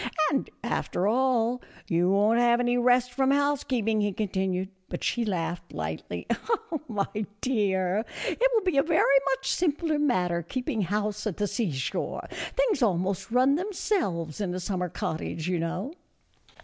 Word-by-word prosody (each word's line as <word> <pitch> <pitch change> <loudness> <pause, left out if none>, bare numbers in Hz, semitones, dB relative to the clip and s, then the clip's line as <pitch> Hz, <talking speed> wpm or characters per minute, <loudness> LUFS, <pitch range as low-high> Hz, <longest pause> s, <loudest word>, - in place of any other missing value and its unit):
" 310 -2 +2
And 275 - 0
after 180 - -1
all, 245 +1 +2 0.3
you 175 -1 +2
won't 210 +4 +4
have 240 0 +4
any 245 0 +2
rest 245 0 +3
from 265 +1 +2
housekeeping," 265 -6 +1
he 205 0 +1
continued; 190 -2 -1 0.2
but - - -5
she 240 - +1
laughed 175 -4 -3
lightly, 80 +2 -4 0.3
" 330 -9 -7
My 210 -1 -2
dear, 200 -5 +1 0.2
it - - -3
will 450 -4 +2
be 365 -6 +1
a - - +7
very 295 -3 +4
much 270 0 -2
simpler 315 -2 +1
matter 180 -12 +1
keeping 230 +4 -2
house 210 +3 -1
at 200 - -3
the 205 - +1
seashore; 185 - -2 0.3
things - - +2
almost 190 -3 +1
run 255 +4 +4
themselves 325 - -1
in 180 -3 -1
a - - -2
summer 180 -1 -2
cottage, 160 +1 -3
you 180 -2 0
know." 180 - -3
220 Hz, 155 wpm, -27 LUFS, 185-265 Hz, 0.3 s, a